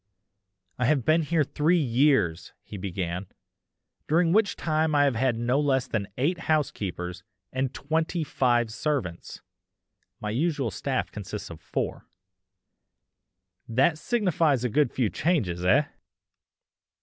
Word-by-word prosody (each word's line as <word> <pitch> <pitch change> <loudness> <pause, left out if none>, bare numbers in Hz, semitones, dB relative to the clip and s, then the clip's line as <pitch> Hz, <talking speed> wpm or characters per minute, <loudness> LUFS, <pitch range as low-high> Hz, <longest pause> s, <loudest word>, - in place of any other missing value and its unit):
"I 125 - +2
have 135 -2 +2
been 160 +2 +4
here 160 0 +1
three 155 +5 +2
years!" 130 - +2
he - - -10
began, 90 -1 -4 0.8
"during 165 +2 +3
which 215 -1 +3
time 155 -1 0
I 145 - +5
have 140 -2 +3
had 120 0 +1
no 120 +4 +1
less 135 -3 +2
than 105 -6 -2
eight 165 +7 0
housekeepers 95 - -1 0.3
and 130 0 -1
twenty 160 +3 -1
five 120 -5 +1
servants 120 - -3 0.8
(my 105 - -3
usual 140 -1 0
staff - - -2
consists - - -7
of - - -10
four); - - -4 1.6
that 135 +7 +2
signifies 170 - +1
a 125 - +1
good 140 +1 +2
few 120 -6 0
changes. 105 - 0
Eh?" 115 +11 +5
135 Hz, 125 wpm, -26 LUFS, 115-155 Hz, 1.6 s, I